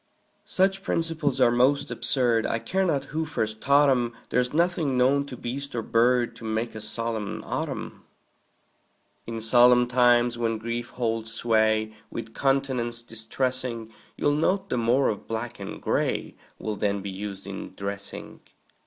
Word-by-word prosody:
Such 195 +1 +2
principles 165 -7 -1
are 125 -2 +5
most 130 +4 +2
absurd, 120 -4 +1
I - - 0
care 190 +11 -1
not 145 -7 0
who 160 +1 0
first 110 -8 -3
taught 140 +1 +5
'em; 120 -3 +2 0.2
There's 125 0 +1
nothing 165 -4 +1
known 140 +3 +3
to 125 - -8
beast 135 +3 -5
or 115 - -1
bird 120 +2 +2
To - - -12
make 110 +1 -2
a 110 - -7
solemn 110 -1 -4
autumn. - - -4 1.2
In 115 -1 -4
solemn 125 +2 +6
times, 120 -1 +3
when 115 -1 0
grief 115 +2 -4
holds 115 -2 -2
sway 110 -1 +2 0.2
With 115 -1 -7
countenance 130 -4 0
distressing, 115 0 -3 0.2
You'll 145 - +2
note 185 +6 0
the 125 - +1
more 120 +4 +3
of 105 - -4
black 115 +1 -4
and 100 - -6
gray - - -1 0.2
Will 110 -1 -3
then 100 -1 0
be 100 - -4
used 100 0 -6
in 100 -1 -7
dressing. 100 0 -5
120 Hz, 155 wpm, -26 LUFS, 110-135 Hz, 1.2 s, solemn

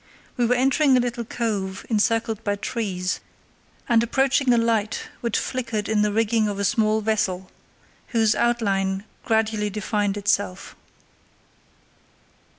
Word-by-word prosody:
We 240 -1 +1
were 245 - +3
entering 270 +2 +3
a - - +4
little 240 -1 -2
cove 205 -5 -3
encircled 225 0 0
by 205 -1 0
trees, 195 -4 -3 0.7
and 235 -2 +4
approaching 270 +2 +2
a 240 - +4
light 225 -2 0
which 235 -3 -1
flickered 235 -5 -2
in 220 -1 +2
the 210 0 +2
rigging 220 0 +2
of 205 -1 -3
a 200 - -1
small 215 +2 +2
vessel, 190 -4 -1 0.6
whose 225 -3 +2
outline 200 -5 0 0.2
gradually 220 -2 +1
defined 205 0 -1
itself. 200 -1 -1
220 Hz, 130 wpm, -23 LUFS, 205-235 Hz, 0.7 s, a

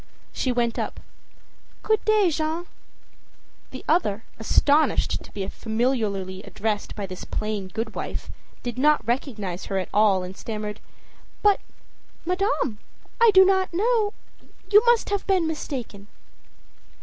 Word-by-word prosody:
She 255 - 0
went 240 -1 0
up. - - -3 0.8
âGood 435 -1 +2
day, 425 -5 +4
Jeanne.â 320 +2 -2 1.0
The 260 - -9
other, 225 - +1 0.2
astonished 290 +7 +2
to - - -14
be 195 -2 -4
familiarly 220 -6 -1
addressed 210 0 -3
by 205 - -4
this 185 -1 -8
plain 215 -3 -3
good 220 +4 -4
wife, - - -5 0.3
did 245 0 -4
not 300 -1 +4
recognize 215 -8 -2
her 195 - -2
at 185 - -2
all 205 -3 +4
and 180 +1 -7
stammered: 210 -1 -5 0.7
âBut 410 -1 +6 0.7
madame! 365 - 0 0.4
I 465 - +8
do 380 -1 +8
not 380 -1 +2
know 435 +1 +2 0.6
You 420 +1 +8
must 475 -3 +4
have 405 -1 -1
mistaken. 295 - -2
245 Hz, 125 wpm, -25 LUFS, -, 1.0 s, I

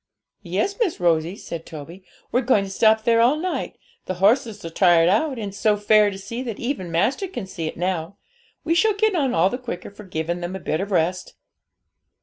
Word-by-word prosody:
'Yes, 205 - -2
Miss 435 -9 0
Rosie,' 170 0 +1
said 170 -5 -7
Toby; 165 +4 -10 0.3
'we're 250 - +2
going 235 -5 +3
to 195 - -7
stop 220 +2 +3
there 230 0 +4
all 245 +5 +4
night; 355 +4 -3 0.3
the 185 - -2
horses 210 +1 +2
are 165 - -5
tired 170 -2 +4
out, 255 - +1
and 210 -3 -4
it's 195 - -11
so 215 -2 +3
fair 210 0 +4
to 195 - -7
see, 220 +5 -6
that 235 -5 -5
even 235 -8 -3
master 220 - +1
can 355 - -6
see 170 -4 -5
it - - -6
now. 180 +1 -2 0.5
We 330 - +1
shall 425 +4 +3
get 435 0 +2
on 280 -8 +1
all 175 +4 +3
the 250 - -3
quicker 215 -7 -6
for 210 +1 -12
giving 170 -1 -3
them 175 +2 -5
a - - -5
bit 160 -1 -2
of 200 - -4
rest.' 180 -1 -1
200 Hz, 215 wpm, -23 LUFS, 175-245 Hz, 0.5 s, there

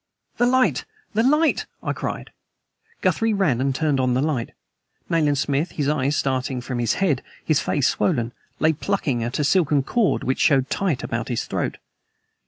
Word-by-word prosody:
"The 240 - +3
light! 255 +1 +2 0.3
The 215 - +2
light!" 300 +6 +2 0.2
I - - -1
cried. - - -5 0.7
Guthrie 225 -1 +1
ran 155 -12 +1
and 135 - +1
turned 150 -2 +1
on 130 -1 +2
the 130 - +2
light. 140 -7 -1 0.6
Nayland 150 -4 +2
Smith, 140 +4 0
his 145 -3 -1
eyes 145 -1 +1
starting 130 -1 -1
from 125 0 -4
his 120 -2 +1
head, 160 -10 +1 0.2
his 155 -3 +3
face 140 -2 +1
swollen, 125 -10 0 0.3
lay 160 +1 +3
plucking 145 - -1
at 120 +2 -3
a 150 - +1
silken 150 -3 +3
cord 225 - +1
which 130 - -1
showed 135 -2 +3
tight 175 -9 0
about 115 -1 -3
his 120 -3 -2
throat. - - -2
145 Hz, 175 wpm, -23 LUFS, 130-180 Hz, 0.7 s, The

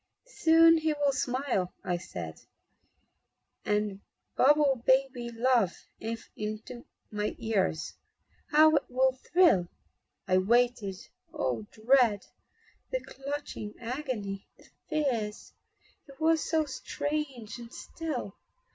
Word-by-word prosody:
"Soon 330 0 +7
he 315 -1 +1
will 290 -1 +2
smile," 255 -7 -1
I 175 - -1
said, 85 - -7 1.2
"And 210 -1 0 0.3
babble 280 -2 +4
baby 260 -2 +2
love 235 -5 +2 0.3
into 220 +1 -6 0.3
my 210 0 -2
ears 195 -7 -1 0.6
How 310 +1 +6
it 280 - -1
will 260 +1 +3
thrill!" 260 - +3 0.6
I 185 0 +4
waited 235 -1 +2 0.4
Oh, 115 -5 -2
the 215 - -18
dread, 240 -5 +4 0.6
The - - -2
clutching 275 -6 -6
agony, 235 -6 -4
the - - -20 0.2
fears! 245 -9 -2 0.5
He 275 - -12
was 320 0 +3
so 315 -1 +2
strange 275 -4 -4
and 235 -1 -10
still. 280 -13 -5
245 Hz, 105 wpm, -29 LUFS, 210-290 Hz, 1.2 s, Soon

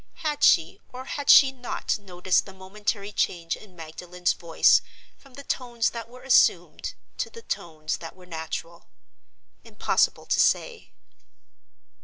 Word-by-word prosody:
Had 295 -1 -1
she, 165 -2 +4
or 255 +1 -8
had 285 +1 -4
she 270 -2 +9
not, 250 -4 -3
noticed 185 -1 0
the 195 - -12
momentary 200 +2 -4
change 170 -4 -1
in 195 -4 -16
Magdalen's 175 +2 -3
voice 170 -1 +4 0.3
from 275 -3 -19
the 280 - -9
tones 240 -4 -1
that 230 -1 -7
were 250 +1 -14
assumed 265 -1 +2 0.2
to - - -1
the 460 - -12
tones 155 - -4
that 165 - -9
were 185 -1 -16
natural? 165 0 -6 0.8
Impossible - - 0
to - - 0
say. 465 -3 +1
195 Hz, 140 wpm, -25 LUFS, 170-250 Hz, 0.8 s, she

